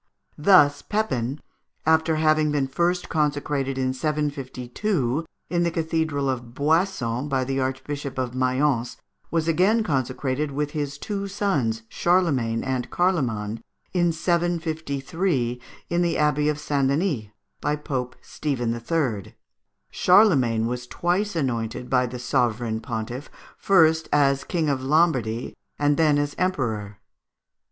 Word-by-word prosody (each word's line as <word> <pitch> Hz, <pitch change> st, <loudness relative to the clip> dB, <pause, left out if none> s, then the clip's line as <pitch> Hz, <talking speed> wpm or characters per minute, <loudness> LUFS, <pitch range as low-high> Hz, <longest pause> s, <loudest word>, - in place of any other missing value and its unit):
Thus 145 Hz, -4 st, +5 dB
Pépin, 140 Hz, -, -1 dB, 0.5 s
after 160 Hz, 0 st, +3 dB
having 155 Hz, -1 st, +3 dB
been 145 Hz, -2 st, +1 dB
first 175 Hz, +6 st, 0 dB
consecrated 145 Hz, -3 st, -1 dB
in 130 Hz, 0 st, 0 dB
752 145 Hz, -, -2 dB, 0.2 s
in 175 Hz, +1 st, 0 dB
the 170 Hz, -, +2 dB
Cathedral 160 Hz, -3 st, -1 dB
of 120 Hz, -2 st, -3 dB
Boissons, 145 Hz, -5 st, 0 dB
by 135 Hz, -2 st, +1 dB
the 135 Hz, +1 st, -2 dB
Archbishop 135 Hz, +1 st, -3 dB
of 125 Hz, -2 st, -2 dB
Mayence, 130 Hz, -1 st, 0 dB, 0.3 s
was 165 Hz, -1 st, 0 dB
again 190 Hz, +8 st, +3 dB
consecrated 135 Hz, -, -1 dB
with 145 Hz, +1 st, -2 dB
his 145 Hz, -2 st, -3 dB
two 200 Hz, +4 st, -4 dB
sons 145 Hz, -, -1 dB
Charlemagne 140 Hz, -12 st, +1 dB
and 130 Hz, -2 st, -2 dB
Carloman, 115 Hz, -, 0 dB, 0.3 s
in 175 Hz, -2 st, +3 dB
753, 160 Hz, -5 st, -1 dB, 0.3 s
in 170 Hz, +1 st, 0 dB
the 170 Hz, -1 st, +1 dB
Abbey 150 Hz, 0 st, +2 dB
of 150 Hz, -, -1 dB
St. 140 Hz, -2 st, 0 dB
Denis, 140 Hz, -, 0 dB, 0.4 s
by 150 Hz, -, +1 dB
Pope 130 Hz, -4 st, -4 dB
Stephen 125 Hz, -6 st, -2 dB
III. 120 Hz, -, -2 dB, 0.6 s
Charlemagne 140 Hz, -, +4 dB
was 125 Hz, +1 st, -3 dB
twice 180 Hz, +7 st, -1 dB
anointed 125 Hz, -4 st, -2 dB
by 125 Hz, -1 st, +3 dB
the 125 Hz, +1 st, -6 dB
Sovereign 120 Hz, -2 st, 0 dB
Pontiff, 120 Hz, +4 st, -5 dB, 0.3 s
first 160 Hz, -4 st, +3 dB
as 140 Hz, -2 st, +3 dB
King 165 Hz, -4 st, -1 dB
of 140 Hz, -3 st, 0 dB
Lombardy, 130 Hz, -6 st, +1 dB, 0.2 s
and 145 Hz, 0 st, +2 dB
then 150 Hz, -1 st, +3 dB
as 145 Hz, 0 st, -1 dB
Emperor. 110 Hz, -, -1 dB
145 Hz, 125 wpm, -24 LUFS, 125-165 Hz, 0.6 s, Thus